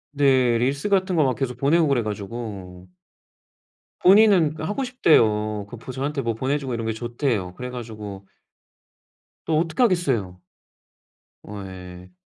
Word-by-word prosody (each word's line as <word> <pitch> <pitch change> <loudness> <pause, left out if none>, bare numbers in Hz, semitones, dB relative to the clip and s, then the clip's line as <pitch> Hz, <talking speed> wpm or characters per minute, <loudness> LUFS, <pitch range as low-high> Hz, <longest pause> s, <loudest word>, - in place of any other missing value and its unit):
네 130 -4 +3
릴스 140 +9 -1
같은 190 -2 +1
거 155 - +4
막 130 -2 +2
계속 125 -3 -3
보내고 155 +4 +3
그래 130 -5 +1
가지고. 100 -4 -7 1.2
본인은 190 -5 +6
그 155 - -6
하고 210 +10 -2
싶대요. 110 - +2
그 120 - -10
보 130 - -8
저한테 140 +2 -3
뭐 115 -3 -1
보내 135 +5 -1
주고 130 -4 -4
이런 115 -1 -3
게 115 - 0
좋대요. 120 -5 -2
그래 125 +3 -6
가지고 105 -5 -8 1.2
또 155 -1 +1
어떻게 165 +8 -1
하겠어요? 130 - 0 1.0
어 100 -1 -8
예. 90 -1 -11
125 Hz, 280 characters per minute, -23 LUFS, 105-150 Hz, 1.2 s, 본인은